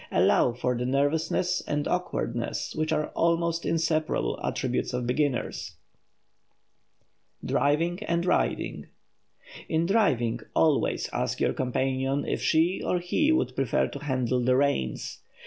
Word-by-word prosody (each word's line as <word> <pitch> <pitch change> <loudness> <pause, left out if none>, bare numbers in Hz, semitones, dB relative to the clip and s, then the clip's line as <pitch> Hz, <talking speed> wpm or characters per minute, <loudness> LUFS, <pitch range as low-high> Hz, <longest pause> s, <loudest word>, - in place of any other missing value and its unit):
Allow 120 - +3
for 125 +1 -1
the 125 +1 -2
nervousness 160 +6 +1
and 145 0 -1
awkwardness 180 -9 -2
which 155 0 -1
are 155 -1 +2
the - - -4
almost 170 0 0
inseparable 160 -1 0
attributes - - -1
of 125 -1 -2
beginners. 130 +1 -1 1.6
[Sidenote: - - -12
DRIVING 165 +8 +1
AND 170 -1 0
RIDING] - - 0 0.8
In 160 +1 +1
driving 170 - +2 0.2
always 155 -3 +2
ask - - -1
your - - +1
companion 135 +2 -1
if - - -2
she 165 +4 +2
or 180 - +1
he 180 - +1
would 315 - +1
prefer 135 -3 +1
to 140 - -7
handle 130 -3 0
the 125 +1 +3
reins. 135 - -1
150 Hz, 130 wpm, -27 LUFS, 130-170 Hz, 1.6 s, Allow